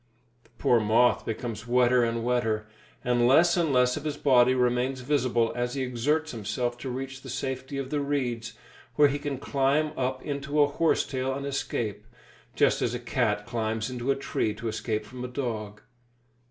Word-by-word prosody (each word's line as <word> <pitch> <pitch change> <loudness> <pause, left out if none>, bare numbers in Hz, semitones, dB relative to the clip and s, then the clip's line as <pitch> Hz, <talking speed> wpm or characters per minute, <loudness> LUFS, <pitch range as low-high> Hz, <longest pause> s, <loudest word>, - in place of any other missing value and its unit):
The - - -27
poor 120 - +3
moth 115 +3 +3
becomes 115 0 -4
wetter 125 0 +4
and 115 0 -1
wetter, 115 -3 0 0.4
and 120 -1 +2
less 165 +7 +5
and 170 -4 +1
less 125 -1 +3
of 150 - -6
his 150 -2 -3
body 130 -3 +4
remains 125 +1 +1
visible 125 -4 +1
as 120 +1 -2
he 135 - -1
exerts 145 +6 0
himself 120 +2 -2
to 130 - -5
reach 135 +1 -5
the 135 - -10
safety 130 +1 -4
of 135 -1 -4
the 150 - 0
reeds, 130 -5 -2 0.4
where 145 -1 +6
he 145 +1 -2
can 145 -2 -3
climb 140 +3 +1
up 130 0 -2
into 145 0 -2
a 145 - +7
horse 160 +3 +1
tail 130 0 -2
and 140 0 -5
escape, 115 -6 -3 0.5
just - - +3
as - - 0
a - - -3
cat 105 - 0
climbs 115 0 -2
into 125 +1 -4
a 135 - +4
tree 110 -5 -2
to 115 +2 -5
escape 110 -1 -2
from 125 +3 -8
a - - -3
dog. 110 -5 -4
125 Hz, 185 wpm, -27 LUFS, 120-140 Hz, 0.5 s, a